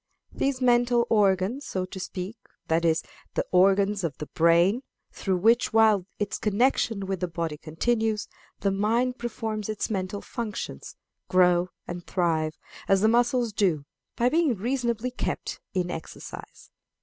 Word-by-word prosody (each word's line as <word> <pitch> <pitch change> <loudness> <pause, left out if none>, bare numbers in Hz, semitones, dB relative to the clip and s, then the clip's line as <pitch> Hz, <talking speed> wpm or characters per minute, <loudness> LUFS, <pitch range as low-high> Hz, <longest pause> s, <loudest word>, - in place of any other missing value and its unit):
These 270 -1 -1
mental 240 -1 +4
organs, 205 +5 +2
so 185 -1 -2
to 185 +1 -8
speak 185 +3 -5 0.3
that 165 +1 +2
is, 165 -1 +2 0.3
the - - 0
organs 195 +2 +4
of 155 -6 -2
the 150 - -5
brain, 170 - +3 0.3
through 190 -2 -1
which, 230 +5 +3
while 215 -4 +4
its 205 -2 -2
connection 220 -1 +1
with 190 -1 -2
the 180 - -1
body 165 -2 -3
continues, 215 +8 -1 0.3
the 200 - +2
mind 230 +6 +1
performs 220 -3 -4
its 215 0 -2
mental 190 0 -3
functions 210 - -5 0.3
grow 180 -1 +4 0.2
and 175 0 -6
thrive, 160 -3 0 0.3
as 195 -1 +4
the 215 - +5
muscles 240 0 +2
do, 175 -9 +1 0.3
by 240 - +2
being 310 -2 +2
reasonably 240 +2 -1
kept 250 - -4 0.2
in 180 -1 0
exercise. 160 - -9
200 Hz, 145 wpm, -26 LUFS, 180-235 Hz, 0.3 s, the